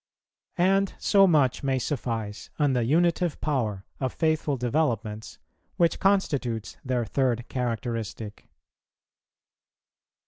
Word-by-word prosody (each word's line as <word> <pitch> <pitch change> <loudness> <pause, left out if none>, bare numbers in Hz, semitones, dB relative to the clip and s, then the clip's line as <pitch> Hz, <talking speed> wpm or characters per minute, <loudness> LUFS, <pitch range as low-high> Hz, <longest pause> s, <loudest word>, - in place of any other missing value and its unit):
And 195 +2 +2
so 195 -2 +5
much 145 -7 +3
may 135 -1 0
suffice 115 -5 -3
on 145 -3 +2
the 125 -2 +1
unitive 170 +4 +2
power 110 -10 -1
of 130 -2 -2
faithful 155 -3 +1
developments, 115 - -1 0.4
which 170 -2 +2
constitutes 130 - 0
their 125 -2 -1
third 120 0 0
characteristic. 115 -3 -4
130 Hz, 100 wpm, -26 LUFS, 115-160 Hz, 0.4 s, so